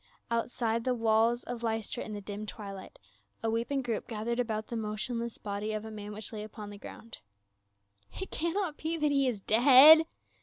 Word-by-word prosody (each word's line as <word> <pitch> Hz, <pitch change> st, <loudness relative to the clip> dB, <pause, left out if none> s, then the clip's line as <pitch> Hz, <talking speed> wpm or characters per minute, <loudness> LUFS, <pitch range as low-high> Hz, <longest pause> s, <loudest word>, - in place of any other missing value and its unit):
Outside 230 Hz, -1 st, -1 dB
the 255 Hz, 0 st, 0 dB
walls 230 Hz, +1 st, +2 dB
of 240 Hz, -1 st, -6 dB
Lystra 225 Hz, -2 st, -2 dB
in 220 Hz, -, -8 dB
the 205 Hz, -, -5 dB
dim 205 Hz, +1 st, -6 dB
twilight, 200 Hz, -, -8 dB, 0.5 s
a 225 Hz, -, +1 dB
weeping 240 Hz, +4 st, -1 dB
group 230 Hz, -3 st, -3 dB
gathered 230 Hz, +2 st, -3 dB
about 220 Hz, -3 st, -1 dB
the 235 Hz, -, -6 dB
motionless 230 Hz, +2 st, -3 dB
body 205 Hz, +1 st, -4 dB
of 215 Hz, 0 st, -4 dB
a 220 Hz, -, -7 dB
man 210 Hz, -1 st, -7 dB
which 215 Hz, +2 st, -6 dB
lay 215 Hz, -, -5 dB
upon 210 Hz, -1 st, -8 dB
the 205 Hz, -, -10 dB
ground. 230 Hz, +2 st, -10 dB, 0.5 s
" 100 Hz, 0 st, -37 dB
It 380 Hz, -, -5 dB
cannot 340 Hz, 0 st, -2 dB
be 325 Hz, +1 st, -2 dB
that 300 Hz, -2 st, +1 dB
he 275 Hz, -1 st, +2 dB
is 225 Hz, -6 st, -2 dB
dead 275 Hz, +9 st, +8 dB
225 Hz, 190 wpm, -30 LUFS, 210-245 Hz, 0.5 s, dead